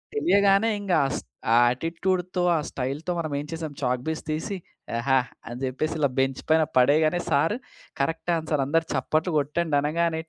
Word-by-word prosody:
తెలియగానే 200 - +4
ఇంగా 190 -5 +1
అస్ - - -3 0.3
ఆ - - +6
ఆటిట్యూడ్‌తో 180 +6 -1
ఆ - - +1
స్టైల్‌తో 140 +7 -3
మనం 155 -3 -3
ఏం 145 - -5
చేసాం 160 -3 -5
చాక్‌పీస్ 125 +5 -1
తీసి 165 +6 -2 0.4
యెహా! 130 +3 +3 0.3
అని 120 +2 -6
చెప్పేసి 155 +5 -2
ఇలా 140 -2 +3
బెంచ్ 135 0 0
పైన 160 0 +5
పడేయగానే 155 +6 +4
సార్ 160 +9 +3 0.5
కరెక్ట్ 165 +4 -1
ఆన్సర్ 155 -3 -1
"అందరూ 165 +3 +1
చప్పట్లు 155 +5 0
కొట్టండి" 150 +1 0
అనగానే 160 +2 0
155 Hz, 150 wpm, -25 LUFS, 140-170 Hz, 0.5 s, ఆ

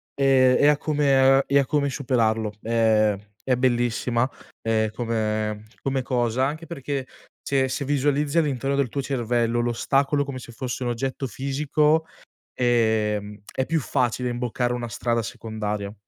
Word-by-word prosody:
e 130 -2 +4
e 145 - +5
a 150 -1 +5
come 135 -3 +3
e 140 +1 +4
a 135 - +2
come 140 0 +1
superarlo. 115 -5 0
Ehm, 110 -2 +3 0.3
è 130 -1 +2
bellissima, 120 0 +1 0.3
ehm, 110 -1 +1
come 110 -2 -2 0.2
come 135 -1 -1
cosa, 125 0 0
anche 155 +4 -4
perché 140 -4 -4 0.4
se 135 -1 +1
se 140 +1 -3
visualizzi 145 +2 +1
all'interno 140 -3 +1
del 140 -3 +1
tuo 140 +4 -2
cervello 120 -2 0
l'ostacolo, 135 +4 +1
come 135 -2 -6
se 120 - -11
fosse 125 +2 -4
un 120 - -1
oggetto 130 +3 -3
fisico, 150 +5 +1 0.5
ehm, 110 -4 +1
è 130 - -1
più 165 0 +1
facile 125 -1 0
imboccare 120 0 -1
una 120 -1 -4
strada 115 +1 -1
secondaria. 105 -2 -4
125 Hz, 145 wpm, -24 LUFS, 115-140 Hz, 0.5 s, e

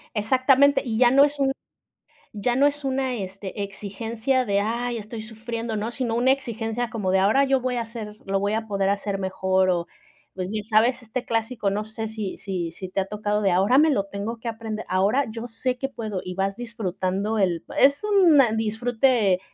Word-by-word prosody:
Exactamente, 260 +6 +4
y 225 -4 -2
ya 245 0 +6
no 275 +2 +7
es 290 0 0
un 270 -1 +2 0.8
ya 240 +4 0
no 280 +2 +5
es 290 0 -1
una, 265 -1 0
este, 195 0 -6
exigencia 220 +6 -2
de: 200 -1 +2
"Ay 235 +3 -1
estoy 220 +1 -7
sufriendo", 225 0 -5
¿no?, 215 +2 -2
sino 240 -2 -2
una 245 +3 +4
exigencia 235 -2 -3
como 205 -4 -2
de: 190 - +3
"Ahora 210 +9 +4
yo 270 -1 +2
voy 250 0 -1
a 235 - 0
hacer 225 -2 -8
lo 195 0 +1
voy 200 +1 0
a 220 0 -2
poder 195 -2 0
hacer 200 0 -2
mejor", 190 0 +1
o, 170 -1 0 0.5
pues, 185 0 -4
bien 215 -1 -3
sabes 230 +4 +2
este 240 +2 -4
clásico 225 -1 -1
no 205 +2 -2
sé 220 +1 -5
si 215 -3 -5
si 180 -4 -3
si 185 +2 -8
te 195 - 0
ha 190 - -2
tocado 210 +1 -1
de: 195 - +3
"Ahora 195 +8 +3
me 310 +2 +5
lo 200 -9 +1
tengo 200 +4 -5
que 235 - -5
aprender, 220 -1 -5
ahora 200 +9 +2
yo 225 +2 -6
sé 245 +2 -2
que 270 - -2
puedo". 215 -7 -4
Y 180 - -5
vas 195 +1 -1
disfrutando 205 -2 -2
el 175 -4 +1
es 280 +1 +5
un 385 -7 +5 0.2
disfrute 225 -2 +2
220 Hz, 205 wpm, -24 LUFS, 200-245 Hz, 0.8 s, no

